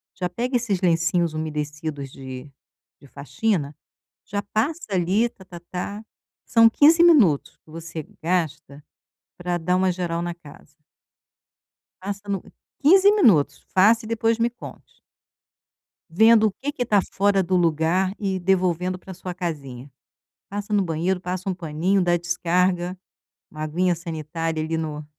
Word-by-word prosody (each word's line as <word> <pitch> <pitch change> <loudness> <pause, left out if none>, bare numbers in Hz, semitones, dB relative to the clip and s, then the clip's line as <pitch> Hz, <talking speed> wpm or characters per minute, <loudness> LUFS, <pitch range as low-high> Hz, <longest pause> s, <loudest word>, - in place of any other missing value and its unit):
já 180 - -2
pega 245 +8 -3
esses 210 -6 0
lencinhos 170 -1 +1
umedecidos 150 -2 -4
de 130 +1 -9 0.5
de - - -18
faxina, 150 - -2 0.5
já 205 0 -3
passa 275 +11 -2
ali, 190 +6 +1
tá-tá-tá, 180 +2 -8 0.4
são 230 -1 +6
15 310 +8 +5
minutos 240 - +4
que - - -27
você 165 0 -7 0.2
gasta 160 -4 -2 0.5
pra 175 0 -2
dar 180 +2 0
uma 185 0 +2
geral 170 -1 -3
na 175 0 -3
casa. 150 -3 -16 1.3
Faça 200 +1 -6
no 195 -2 -2 0.4
15 380 +7 +6
minutos, 220 - +3
faça 220 +4 +5
e - - -8
depois 230 0 0
me 230 +1 +2
conte. 240 - -13 1.1
Vendo 220 +5 +5
o - - -2
que 285 +2 -2
que 250 -4 -3
tá 210 -3 +3
fora 200 0 +2
do 185 +1 0
lugar 170 +2 +1
e 195 -2 -2
devolvendo 180 -1 0
para 190 +1 -11
sua 180 0 -7
casinha, 145 -7 -6 0.6
passa 205 +1 -5
no 205 -1 +3
banheiro, 175 +2 -1
passa 185 +1 -4
um 190 - -1
paninho, 175 +3 0
dá 175 -1 +2
descarga, 175 +1 0 0.5
uma 155 - -9
aguinha 175 +4 0
sanitária 165 -1 -4
ali 160 +1 -2
no 155 -2 -4
180 Hz, 140 wpm, -23 LUFS, 160-205 Hz, 1.3 s, são